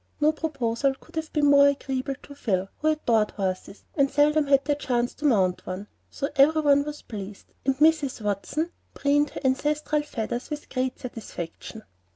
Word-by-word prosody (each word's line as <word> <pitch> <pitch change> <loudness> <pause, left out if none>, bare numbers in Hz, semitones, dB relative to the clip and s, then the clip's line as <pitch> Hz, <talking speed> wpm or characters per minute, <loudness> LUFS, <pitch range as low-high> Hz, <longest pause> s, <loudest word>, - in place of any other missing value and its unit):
No 305 +1 +4
proposal 275 -4 -1
could - - -18
have 320 -1 -3
been 300 -2 +2
more 285 0 +7
agreeable 275 -1 -1
to 285 - -11
Phil, 195 -8 -1
who 310 - 0
adored 235 -9 +2
horses, 190 0 -4
and 275 -2 +3
seldom 295 +1 +3
had 275 -1 +4
the 295 - +2
chance 245 -4 -1
to 300 - -7
mount 190 -9 +2
one; 185 +2 -4 0.2
so 280 - -3
every 310 +3 +5
one 285 -1 +5
was 300 0 -7
pleased, 205 -2 -9
and 270 -1 +2
Mrs. 300 -3 +3
Watson 210 - -2 0.2
preened 290 +1 +2
her - - -8
ancestral 295 +3 +1
feathers 240 -4 -4
with 300 -1 -6
great 255 0 -2
satisfaction. 220 -3 -7
275 Hz, 175 wpm, -26 LUFS, 230-295 Hz, 0.2 s, more